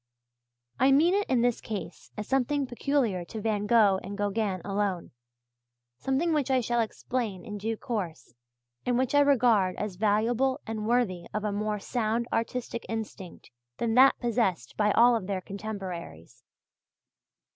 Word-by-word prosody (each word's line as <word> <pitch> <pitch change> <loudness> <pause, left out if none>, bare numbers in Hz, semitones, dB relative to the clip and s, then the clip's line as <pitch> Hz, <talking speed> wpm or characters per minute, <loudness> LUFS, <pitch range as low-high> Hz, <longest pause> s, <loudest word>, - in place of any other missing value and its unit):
I 265 +2 +5
mean 320 +6 +5
it 405 +1 0
in 245 -3 +2
this 245 -1 +1
case 195 -6 -7
as 210 - -5
something 270 +2 +1
peculiar 245 -7 0
to 220 - -7
Van 210 -1 -1
Gogh 205 -4 +5
and 200 +2 -7
Gauguin 205 -2 -1
alone 195 -3 -2 0.9
something 290 +6 0
which 290 -3 0
I 260 -1 +3
shall 240 0 0
explain 225 -3 -3
in 210 -2 -6
due 220 +2 -2
course 185 - -5 0.5
and 245 -1 +1
which 260 +1 0
I 290 - +5
regard 235 -10 +4
as 205 -3 -4
valuable 230 +6 +1
and 220 -1 -4
worthy 220 -8 0
of 215 - -1
a 210 - -1
more 210 +1 -1
sound 230 +2 -1
artistic 235 0 -2
instinct 215 -5 -7 0.3
than 230 -1 0
that 260 +3 +6
possessed 220 - -1
by 210 -1 +2
all 235 -1 +5
their 190 0 -3
contemporaries. 185 - -7
220 Hz, 150 wpm, -28 LUFS, 200-245 Hz, 0.9 s, that